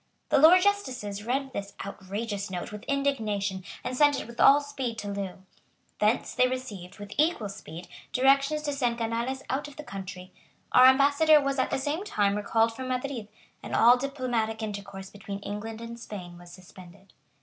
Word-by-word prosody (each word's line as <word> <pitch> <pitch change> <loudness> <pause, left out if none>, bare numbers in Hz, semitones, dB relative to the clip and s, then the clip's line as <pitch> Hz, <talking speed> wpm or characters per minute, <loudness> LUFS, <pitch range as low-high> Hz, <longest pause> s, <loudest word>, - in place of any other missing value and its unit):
The - - +4
Lords 350 +5 +8
justices 255 - -1
read 265 +2 -1
this 200 -2 -5
outrageous 200 +1 -5
note 180 +1 -5
with 210 0 -8
indignation, 215 -9 -1 0.2
and 255 - -3
sent 290 +1 +4
it - - -6
with 235 +1 -12
all 280 +1 +8
speed 270 -5 -4
to 205 - -5
Loo. 195 -2 -5 0.6
Thence 210 +3 +1
they 255 0 +4
received, 220 -9 -6
with 205 0 -9
equal 300 -10 +2
speed, 175 -3 -9 0.2
directions 275 +3 +3
to 290 -1 -1
send 245 -4 0
Canales 235 +3 -2
out 275 +3 -2
of 290 - -13
the 300 - -8
country. 190 -4 -8 0.4
Our 255 +1 +8
ambassador 285 +4 +6
was 275 -1 -1
at 260 - +1
the - - 0
same 290 +7 -2
time 205 - +1
recalled 225 +2 +1
from 260 +1 -5
Madrid; 255 -3 -3 0.3
and - - -4
all 240 +2 +7
diplomatic 245 -5 -2
intercourse 200 -2 -6
between 200 -1 -7
England 220 +3 -6
and 235 0 -8
Spain 185 -6 -8
was 175 0 -13
suspended. 185 +1 -15
230 Hz, 175 wpm, -28 LUFS, 200-275 Hz, 0.6 s, Lords